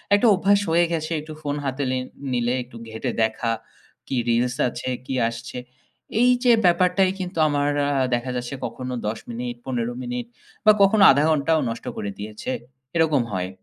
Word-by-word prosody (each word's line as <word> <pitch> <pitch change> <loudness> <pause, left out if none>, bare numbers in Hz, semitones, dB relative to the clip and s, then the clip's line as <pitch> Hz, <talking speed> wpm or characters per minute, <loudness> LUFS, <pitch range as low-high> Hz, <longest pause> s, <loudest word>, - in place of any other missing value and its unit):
একটা 205 +4 +3
অভ্যাস 200 +2 +3
হয়ে 170 +1 +4
গেছে, 160 0 -2
একটু 155 +1 -9
ফোন 145 -1 -2
হাতে 135 +1 -2
নিল 130 0 -1 0.3
নিলে, 120 0 +1
একটু 120 -1 -13
ঘেটে 110 +3 -3
দেখা 110 +1 0 0.6
কি 135 - -2
রিলস 120 +2 +2
আছে, 120 +2 -5 0.2
কি 135 - -4 0.2
আসছে? 115 +1 -8 0.6
এই 245 +1 +5
যে 245 - +6
ব্যাপারটাই 180 +2 +4
কিন্তু 180 -2 -5
আমার 145 -1 +1 0.2
আ - - +1 0.2
দেখা 120 +1 -3
যাচ্ছে, 125 +2 -4
কখনো 125 +2 -5
১০ 110 +1 -2
মিনিট 120 +1 -4
১৫ 120 -2 -2
মিনিট 125 -1 -4 0.4
বা 215 - +9
কখনো 200 +1 +5
১/২ 140 +2 +3
ঘন্টাও 160 +1 +2
নষ্ট 115 - -6
করে 100 - -3
দিয়েছে, 105 +4 -5 0.4
এরকম 160 -5 +3
হয়। 90 -1 -2
130 Hz, 170 wpm, -23 LUFS, 120-165 Hz, 0.6 s, বা